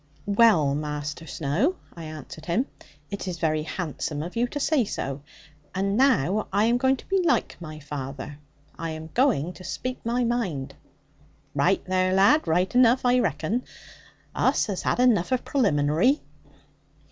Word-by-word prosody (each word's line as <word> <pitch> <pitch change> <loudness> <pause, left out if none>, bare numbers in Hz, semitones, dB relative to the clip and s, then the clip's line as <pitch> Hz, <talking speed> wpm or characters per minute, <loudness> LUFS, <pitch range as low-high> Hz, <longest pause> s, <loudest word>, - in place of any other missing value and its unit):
'Well, 200 -9 +4
Master 150 +2 -4
Snowe,' 170 - 0 0.2
I 165 -1 -8
answered 155 0 -9
him, 185 +10 +1 0.5
'it 200 -1 -5
is 180 -2 -3
very 155 -2 0
handsome 155 -2 -4
of 175 - -7
you 240 +1 +1
to 290 - -5
say 285 -2 +2
so. 140 -8 -4 0.5
And 195 +1 0
now 215 - +2
I 205 +2 +3
am 240 +2 +2
going 265 +1 +3
to - - -13
be 385 -1 +1
like 340 -4 +1
my 155 -2 -8
father, 140 0 -6 0.4
I 165 - -3
am 160 0 -7
going 220 - +2
to 180 +3 -12
speak 255 +7 -5
my 240 +2 0
mind.' 185 - -2 0.8
'Raight 160 +7 +2
there, 185 0 +1
lad; 205 +11 +4
raight 180 +4 +1
enough, 250 0 +4
I 250 0 +4
reckon. 185 - -1 0.7
Us - - +2
has 200 -4 -3
had - - 0
enough 235 -8 +3
of 255 - 0
pralimbinary.' 185 - +2
185 Hz, 160 wpm, -25 LUFS, 155-245 Hz, 0.8 s, Well